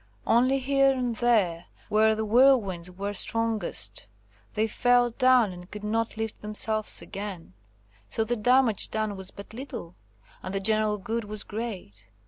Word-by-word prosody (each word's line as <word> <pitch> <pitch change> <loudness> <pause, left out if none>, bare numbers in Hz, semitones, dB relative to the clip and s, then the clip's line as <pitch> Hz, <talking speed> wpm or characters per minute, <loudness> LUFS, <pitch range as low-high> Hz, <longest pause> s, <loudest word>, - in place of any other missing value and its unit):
Only 255 +4 +3
here 275 +1 +3
and 250 -3 -2
there, 200 -9 +1 0.2
where 220 +1 +3
the 220 0 -2
whirlwinds 215 -7 +3
were 200 +3 -5
strongest, 210 - 0 0.5
they 215 - +2
fell 245 +2 +2
down 255 -3 +4
and 180 0 -11
could 210 0 -9
not 225 +1 -2
lift 220 -1 -4
themselves 215 0 -1
again. 195 - -7 0.6
So 225 - +1
the 235 +2 -1
damage 245 -1 +3
done 215 -2 -2
was 190 -1 -8
but 200 +2 -12
little, 235 -8 -7 0.5
and 185 +1 -6
the - - +1
general 215 +1 +2
good 225 +3 -4
was 210 0 -6
great. 205 - -7
215 Hz, 150 wpm, -26 LUFS, 200-240 Hz, 0.6 s, down